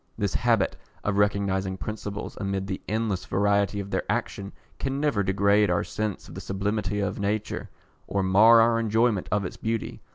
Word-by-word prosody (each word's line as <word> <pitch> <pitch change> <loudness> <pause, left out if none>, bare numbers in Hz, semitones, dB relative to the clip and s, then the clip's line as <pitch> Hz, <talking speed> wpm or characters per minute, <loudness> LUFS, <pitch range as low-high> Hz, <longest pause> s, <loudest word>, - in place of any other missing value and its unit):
This 105 -3 -1
habit 115 -5 +2 0.3
of 100 0 0
recognising 100 -2 +1
principles 105 +1 -5
amid 100 -1 -2
the 95 -1 -4
endless 110 -4 -1
variety 100 +1 +1
of 100 0 -6
their - - +1
action 100 0 -3 0.3
can 135 0 -2
never 145 -8 +1
degrade 100 +1 +3
our 90 - +1
sense 105 -3 -4
of - - -11
the - - -7
sublimity 105 +1 -2
of 100 0 -2
nature, 105 +1 -2 0.4
or 100 -1 0
mar 110 +5 +7
our 115 0 +3
enjoyment 110 -2 +1
of 105 -2 +1
its - - -6
beauty. 115 0 -3
100 Hz, 170 wpm, -26 LUFS, 100-110 Hz, 0.4 s, mar